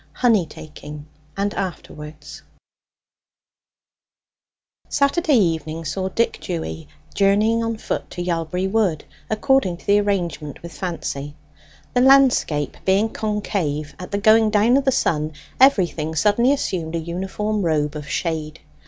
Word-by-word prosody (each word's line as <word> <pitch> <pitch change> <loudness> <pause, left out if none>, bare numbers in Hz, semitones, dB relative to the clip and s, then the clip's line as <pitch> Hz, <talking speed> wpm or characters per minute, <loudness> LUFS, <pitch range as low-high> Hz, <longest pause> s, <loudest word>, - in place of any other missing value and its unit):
HONEY 220 -9 +2
TAKING, 150 -1 -10 0.3
AND 200 +1 0
AFTERWARDS 150 -5 -7 2.5
Saturday 285 +1 +2
evening 165 -4 0
saw 190 +5 -2
Dick 230 +4 0
Dewy 165 -2 -5 0.3
journeying 210 +3 +3
on 230 0 -2
foot - - -4
to 175 - -5
Yalbury 175 +1 -2
Wood, 195 -6 0 0.2
according 220 -5 +2
to - - -19
the 205 0 +4
arrangement 175 -8 -2
with 170 - -8
Fancy. 145 -5 -5 0.6
The 245 - +3
landscape 255 - +4
being 195 +4 +2
concave, 195 -10 -2
at 180 - -7
the 200 - -1
going 220 +1 +5
down 215 +3 +3
of 275 0 +2
the 265 - +4
sun 155 -9 0 0.3
everything 175 - +3
suddenly 215 - +3
assumed 175 - -2
a - - 0
uniform 190 +5 -3
robe 155 -3 0
of 150 -1 -7
shade. 160 -2 -3
185 Hz, 125 wpm, -21 LUFS, 160-215 Hz, 2.5 s, going